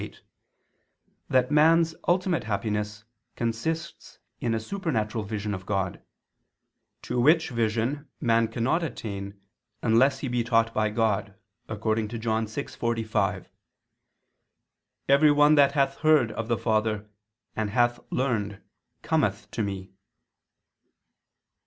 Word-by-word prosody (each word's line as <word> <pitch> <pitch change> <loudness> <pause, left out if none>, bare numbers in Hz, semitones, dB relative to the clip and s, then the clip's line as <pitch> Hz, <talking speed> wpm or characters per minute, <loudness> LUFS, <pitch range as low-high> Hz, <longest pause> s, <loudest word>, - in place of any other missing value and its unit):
8) - - -9 1.1
that 130 +1 +2
man's 160 +2 +4
ultimate 180 - +1
happiness 105 0 -2 0.3
consists 160 +9 -4 0.2
in 115 -1 0
a - - 0
supernatural 110 - -2
vision 105 0 -3
of 95 -1 -7
God: 95 -3 -2 1.0
to 125 - -2
which 160 +3 +4
vision 120 +5 -1
man 115 -1 +2
cannot 115 +9 0
attain 100 -10 -6 0.4
unless 130 +4 +4
he 135 - -4
be 120 -1 0
taught 115 -1 +2
by 110 0 +1
God, 105 -2 0 0.3
according 110 0 -1
to 115 +2 -6
John 110 0 -1
6:45: 115 +1 -2 1.6
"Every 140 +2 +6
one 145 +1 +5
that 140 -2 +5
hath 135 -2 +1
heard 155 -8 +4
of 110 +1 -4
the 120 -1 +1
Father 110 -1 0 0.5
and 110 -1 -1
hath 120 +2 +2
learned 105 -6 -1 0.4
cometh - - 0
to - - -3
Me." 95 -2 -4
115 Hz, 115 wpm, -26 LUFS, 110-140 Hz, 1.6 s, Every